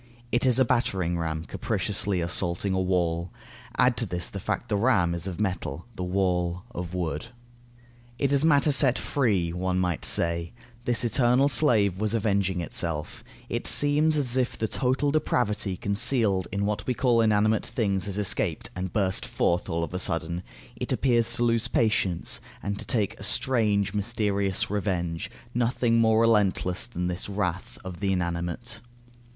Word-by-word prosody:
It 120 Hz, +2 st, +2 dB
is 125 Hz, -, +5 dB
a 130 Hz, -, +4 dB
battering 95 Hz, -8 st, 0 dB
ram 80 Hz, 0 st, -3 dB
capriciously 100 Hz, -2 st, -1 dB
assaulting 85 Hz, +2 st, 0 dB
a 95 Hz, -, +1 dB
wall. 85 Hz, -2 st, 0 dB, 0.5 s
Add 125 Hz, -1 st, +4 dB
to 115 Hz, -, +1 dB
this 90 Hz, -1 st, -3 dB
the 100 Hz, -, -6 dB
fact 120 Hz, -, -3 dB
that 105 Hz, -, +1 dB
the 100 Hz, -, -1 dB
ram 105 Hz, -9 st, +3 dB
is 85 Hz, +2 st, -4 dB
of 90 Hz, -3 st, -5 dB
metal, 90 Hz, -7 st, -3 dB
the 90 Hz, -, -4 dB
wall 90 Hz, -1 st, -1 dB
of 90 Hz, -4 st, -6 dB
wood. 85 Hz, +1 st, -3 dB, 0.9 s
It 140 Hz, +1 st, 0 dB
is 140 Hz, +1 st, +3 dB
matter 150 Hz, -1 st, +4 dB
set 135 Hz, -2 st, +5 dB
free; 100 Hz, -12 st, 0 dB
one 90 Hz, +1 st, -1 dB
might 90 Hz, -2 st, -1 dB
say, 85 Hz, +2 st, +1 dB, 0.3 s
this 120 Hz, -1 st, +1 dB
eternal 125 Hz, +3 st, +3 dB
slave 115 Hz, -, +3 dB
was 110 Hz, +1 st, 0 dB
avenging 100 Hz, -4 st, 0 dB
itself; 85 Hz, -2 st, -3 dB, 0.2 s
it -, -, -2 dB
seems 150 Hz, +2 st, +3 dB
as 130 Hz, -3 st, 0 dB
if 130 Hz, -1 st, 0 dB
the 110 Hz, -, -1 dB
total 130 Hz, +5 st, 0 dB
depravity 105 Hz, -10 st, 0 dB
concealed 100 Hz, -1 st, +1 dB
in 100 Hz, +1 st, -1 dB
what 105 Hz, 0 st, -3 dB
we 125 Hz, -, 0 dB
call 120 Hz, -3 st, +3 dB
inanimate 110 Hz, 0 st, +2 dB
things 100 Hz, -4 st, -1 dB
has 100 Hz, -1 st, -3 dB
escaped, 105 Hz, -2 st, 0 dB
and 90 Hz, 0 st, -4 dB
burst 95 Hz, -3 st, +1 dB
forth 85 Hz, +1 st, 0 dB
all 85 Hz, 0 st, -1 dB
of 85 Hz, -, -5 dB
a 90 Hz, -, -2 dB
sudden; 85 Hz, -2 st, -2 dB, 0.3 s
it -, -, -5 dB
appears 120 Hz, -3 st, +2 dB
to 120 Hz, -, 0 dB
lose 115 Hz, 0 st, +1 dB
patience, 105 Hz, -7 st, +1 dB, 0.2 s
and 100 Hz, 0 st, -3 dB
to 105 Hz, -, -7 dB
take 105 Hz, 0 st, -1 dB
a -, -, -8 dB
strange 105 Hz, -6 st, 0 dB
mysterious 100 Hz, -3 st, 0 dB
revenge; 90 Hz, -5 st, -2 dB, 0.2 s
nothing 120 Hz, -1 st, +1 dB
more 110 Hz, -1 st, +4 dB
relentless 105 Hz, -5 st, +2 dB
than 90 Hz, -7 st, -4 dB
this 90 Hz, +2 st, -3 dB
wrath 95 Hz, -2 st, -3 dB
of 90 Hz, -2 st, -7 dB
the 100 Hz, -1 st, 0 dB
inanimate. 85 Hz, +5 st, -3 dB
100 Hz, 170 wpm, -26 LUFS, 90-115 Hz, 0.9 s, is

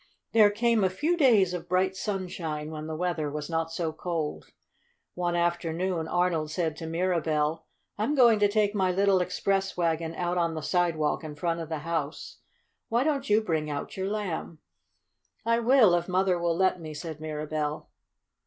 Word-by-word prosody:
There 215 Hz, -2 st, +6 dB
came 225 Hz, +1 st, +2 dB
a 190 Hz, -, +3 dB
few 300 Hz, -, 0 dB
days 225 Hz, -, +4 dB
of 175 Hz, 0 st, -6 dB
bright 185 Hz, +1 st, +1 dB
sunshine, 175 Hz, -6 st, -4 dB
when 155 Hz, 0 st, -6 dB
the 160 Hz, -, -4 dB
weather 170 Hz, -3 st, -1 dB
was 150 Hz, +2 st, -5 dB
not 165 Hz, 0 st, -1 dB
so 165 Hz, -1 st, -2 dB
cold. 160 Hz, -2 st, -4 dB, 0.6 s
One 175 Hz, -1 st, -1 dB
afternoon 170 Hz, 0 st, -1 dB
Arnold 175 Hz, -3 st, 0 dB
said 160 Hz, 0 st, -1 dB
to 160 Hz, -, -6 dB
Mirabell: 160 Hz, -2 st, 0 dB, 0.3 s
"I'm 230 Hz, +8 st, +1 dB
going 235 Hz, -5 st, +6 dB
to 205 Hz, -, +5 dB
take 205 Hz, 0 st, +1 dB
my 190 Hz, -3 st, +1 dB
little 195 Hz, 0 st, +3 dB
express 195 Hz, +2 st, -1 dB
wagon 165 Hz, -1 st, 0 dB
out 175 Hz, +1 st, -1 dB
on 170 Hz, -1 st, 0 dB
the 155 Hz, -, -5 dB
sidewalk 165 Hz, -4 st, 0 dB
in 155 Hz, -1 st, -7 dB
front 165 Hz, +3 st, -1 dB
of 165 Hz, -1 st, -6 dB
the 160 Hz, -, -2 dB
house. 165 Hz, -3 st, -3 dB, 0.5 s
Why 235 Hz, +2 st, +2 dB
don't 280 Hz, -2 st, -1 dB
you 210 Hz, +1 st, +4 dB
bring 160 Hz, -7 st, -1 dB
out 145 Hz, -1 st, -5 dB
your 190 Hz, 0 st, -2 dB
Lamb?" 195 Hz, -6 st, -3 dB, 0.9 s
"I 230 Hz, 0 st, +3 dB
will, 235 Hz, -5 st, +5 dB
if 175 Hz, 0 st, +1 dB
Mother 185 Hz, -1 st, +1 dB
will 170 Hz, -1 st, 0 dB
let 185 Hz, -1 st, +2 dB
me," 155 Hz, -1 st, -7 dB
said 155 Hz, 0 st, -6 dB
Mirabell. 155 Hz, -1 st, -3 dB
175 Hz, 175 wpm, -27 LUFS, 160-195 Hz, 0.9 s, There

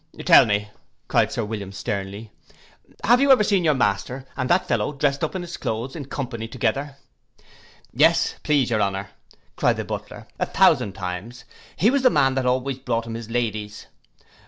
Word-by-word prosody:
'Tell -, -, +7 dB
me,' 105 Hz, 0 st, 0 dB, 0.4 s
cried -, -, +2 dB
Sir 115 Hz, -, -2 dB
William 105 Hz, -2 st, -6 dB
sternly, 100 Hz, +2 st, -5 dB, 0.7 s
'have 240 Hz, +4 st, +4 dB
you 280 Hz, 0 st, +5 dB
ever 255 Hz, -5 st, +6 dB
seen 200 Hz, -3 st, +2 dB
your 155 Hz, -3 st, +3 dB
master 125 Hz, +3 st, -1 dB
and 130 Hz, -1 st, -2 dB
that 180 Hz, +1 st, +2 dB
fellow 115 Hz, +2 st, 0 dB
drest 140 Hz, 0 st, 0 dB
up 160 Hz, -, -2 dB
in 185 Hz, -, -3 dB
his 170 Hz, -1 st, -7 dB
cloaths 115 Hz, +4 st, -4 dB
in 150 Hz, -4 st, -6 dB
company 125 Hz, -4 st, -5 dB
together?' 135 Hz, +4 st, -2 dB, 1.0 s
'Yes, -, -, +3 dB
please 140 Hz, -5 st, +1 dB
your 110 Hz, -2 st, +1 dB
honour,' 95 Hz, 0 st, -2 dB, 0.4 s
cried -, -, +1 dB
the -, -, -4 dB
butler, -, -, -7 dB
'a -, -, 0 dB
thousand 100 Hz, -, +3 dB
times: 95 Hz, +6 st, -6 dB, 0.3 s
he 220 Hz, +6 st, +3 dB
was 280 Hz, 0 st, +1 dB
the 255 Hz, -, +5 dB
man 140 Hz, -, +2 dB
that 130 Hz, -1 st, -1 dB
always 130 Hz, +1 st, -1 dB
brought 115 Hz, -2 st, -2 dB
him 115 Hz, -, -6 dB
his 115 Hz, -1 st, -7 dB
ladies. 110 Hz, -3 st, -3 dB
120 Hz, 180 wpm, -23 LUFS, 105-145 Hz, 1.0 s, Tell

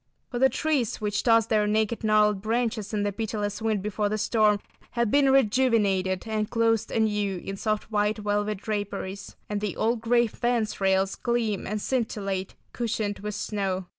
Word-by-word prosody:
For 240 Hz, -, -2 dB
the 265 Hz, +1 st, +5 dB
trees 270 Hz, -3 st, 0 dB
which 205 Hz, -1 st, -1 dB
tossed 230 Hz, -2 st, +4 dB
their 210 Hz, -2 st, +2 dB
naked 220 Hz, +2 st, 0 dB
gnarled 210 Hz, -2 st, +3 dB
branches 225 Hz, -1 st, -1 dB
in 210 Hz, -2 st, 0 dB
the 205 Hz, -, 0 dB
pitiless 205 Hz, 0 st, -3 dB
wind 215 Hz, -3 st, 0 dB
before 210 Hz, 0 st, -1 dB
the 215 Hz, -, -1 dB
storm 215 Hz, -1 st, +3 dB, 0.3 s
have 235 Hz, -3 st, +1 dB
been 280 Hz, -1 st, +4 dB
rejuvenated 215 Hz, -7 st, +2 dB
and 215 Hz, -1 st, -1 dB
clothed 225 Hz, -2 st, +1 dB
anew 210 Hz, -3 st, 0 dB
in 195 Hz, +2 st, -6 dB
soft 215 Hz, +2 st, -2 dB
white 210 Hz, +1 st, +1 dB
velvet 205 Hz, 0 st, -1 dB
draperies, 200 Hz, -1 st, -4 dB
and 205 Hz, -1 st, -3 dB
the 210 Hz, -3 st, -2 dB
old 230 Hz, +1 st, 0 dB
gray 235 Hz, +1 st, +3 dB
fence 230 Hz, -2 st, -1 dB
rails 190 Hz, 0 st, +2 dB
gleam 235 Hz, -4 st, -1 dB
and 210 Hz, +1 st, -3 dB
scintillate, 200 Hz, -7 st, -2 dB, 0.2 s
cushioned 220 Hz, -4 st, -2 dB
with 210 Hz, 0 st, -5 dB
snow. 195 Hz, -3 st, -2 dB
215 Hz, 165 wpm, -26 LUFS, 205-230 Hz, 0.3 s, the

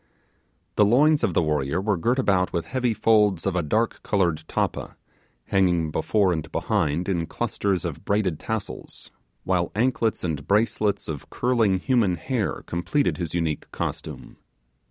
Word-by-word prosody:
The 105 Hz, -, +6 dB
loins 145 Hz, +8 st, +4 dB
of 90 Hz, -, +1 dB
the -, -, +3 dB
warrior 75 Hz, +1 st, 0 dB
were 105 Hz, +1 st, +1 dB
girt 120 Hz, +9 st, 0 dB
about 95 Hz, -8 st, +2 dB
with 85 Hz, -, -2 dB
heavy 125 Hz, -2 st, 0 dB
folds 105 Hz, -5 st, +3 dB
of 95 Hz, -2 st, 0 dB
a 90 Hz, -, +2 dB
dark 110 Hz, +9 st, 0 dB
coloured 90 Hz, -6 st, 0 dB
tappa, -, -, -2 dB, 0.5 s
hanging 90 Hz, -5 st, +2 dB
before 95 Hz, +4 st, +2 dB
and 80 Hz, -2 st, -4 dB
behind 75 Hz, +5 st, 0 dB
in 85 Hz, -4 st, -1 dB
clusters 95 Hz, -4 st, -1 dB
of -, -, -5 dB
braided 100 Hz, -6 st, 0 dB
tassels, 110 Hz, -2 st, -6 dB, 0.3 s
while -, -, 0 dB
anklets 115 Hz, -1 st, +1 dB
and 80 Hz, -5 st, -3 dB
bracelets 105 Hz, -1 st, +1 dB
of 75 Hz, -4 st, -6 dB
curling 115 Hz, -6 st, +2 dB
human 105 Hz, -3 st, +2 dB
hair 115 Hz, -, -2 dB
completed 110 Hz, +12 st, 0 dB
his 85 Hz, -2 st, -3 dB
unique 80 Hz, -3 st, -2 dB
costume. -, -, -6 dB
95 Hz, 150 wpm, -24 LUFS, 85-110 Hz, 0.5 s, The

